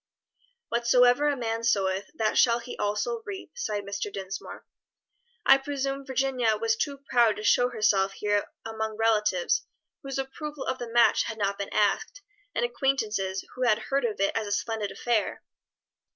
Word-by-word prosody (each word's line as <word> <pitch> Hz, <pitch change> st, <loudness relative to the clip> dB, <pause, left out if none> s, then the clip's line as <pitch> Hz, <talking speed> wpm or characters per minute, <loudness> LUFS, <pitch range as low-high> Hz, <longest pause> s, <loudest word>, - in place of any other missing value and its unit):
"'Whatsoever 245 Hz, +3 st, +4 dB
a 290 Hz, -1 st, +1 dB
man 230 Hz, -1 st, -2 dB
soweth, 195 Hz, -3 st, +1 dB
that 220 Hz, -7 st, 0 dB
shall 235 Hz, -1 st, +5 dB
he 240 Hz, +1 st, -7 dB
also 450 Hz, -, -1 dB
reap,'" 405 Hz, +1 st, -8 dB
sighed 210 Hz, -, -3 dB
Mr. 200 Hz, +1 st, -4 dB
Dinsmore. 195 Hz, 0 st, -7 dB, 0.8 s
"I 270 Hz, 0 st, +7 dB
presume 275 Hz, 0 st, -3 dB
Virginia 260 Hz, -4 st, +1 dB
was 225 Hz, +1 st, +1 dB
too 280 Hz, +5 st, -2 dB
proud 235 Hz, -4 st, +4 dB
to 215 Hz, -, -7 dB
show 245 Hz, +3 st, +4 dB
herself 205 Hz, -4 st, +2 dB
here 205 Hz, 0 st, 0 dB, 0.2 s
among 220 Hz, -1 st, -4 dB
relatives 210 Hz, -5 st, +1 dB, 0.3 s
whose 275 Hz, -2 st, -5 dB
approval 280 Hz, +2 st, -5 dB
of 260 Hz, -, -2 dB
the 240 Hz, -1 st, -6 dB
match 240 Hz, 0 st, +4 dB
had 220 Hz, -, -5 dB
not 200 Hz, -1 st, -1 dB
been 200 Hz, -, -3 dB
asked, 210 Hz, -, 0 dB, 0.3 s
and -, -, +1 dB
acquaintances 220 Hz, -7 st, -1 dB
who 255 Hz, -, -9 dB
had 215 Hz, -, +4 dB
heard 275 Hz, +1 st, -1 dB
of 215 Hz, -4 st, -2 dB
it 195 Hz, -, +1 dB
as 220 Hz, -2 st, -1 dB
a -, -, -5 dB
splendid 215 Hz, 0 st, -1 dB
affair?" 235 Hz, -3 st, -1 dB
230 Hz, 165 wpm, -27 LUFS, 210-265 Hz, 0.8 s, I